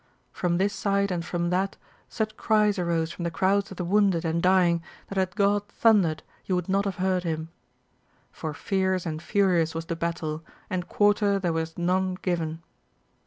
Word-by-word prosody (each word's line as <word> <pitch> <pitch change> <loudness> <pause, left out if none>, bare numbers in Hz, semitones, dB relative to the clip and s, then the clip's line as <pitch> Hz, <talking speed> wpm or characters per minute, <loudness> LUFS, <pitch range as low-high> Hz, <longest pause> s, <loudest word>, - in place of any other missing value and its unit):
From 175 -1 0
this 195 +2 +1
side 200 -1 0
and 175 -2 -1
from 170 0 -2
that 190 +2 0 0.3
such 215 -1 -2
cries 210 -2 +2
arose 170 -2 0
from - - -8
the 170 - 0
crowds 195 +4 +1
of 190 - -10
the 180 - -2
wounded 190 -3 +2
and 165 +1 0
dying 180 -2 +4 0.3
that 195 - -5
had 185 -1 -1
God 205 0 +2
thundered, 200 -11 +3 0.2
you 185 - 0
would 180 -1 -2
not 195 +1 +1
have 195 -2 -2
heard 185 -1 +1
Him! 160 -1 -3 0.8
For 155 - -5
fierce 190 -1 0
and 155 -2 -3
furious 175 -5 +2
was 165 0 -3
the 165 - -3
battle, 165 -1 -3 0.3
and 180 -1 -2
quarter 205 -1 +3
there 180 -4 -1
was 160 0 -3
none 185 +1 +1
given. 165 -2 -2
180 Hz, 180 wpm, -26 LUFS, 170-195 Hz, 0.8 s, dying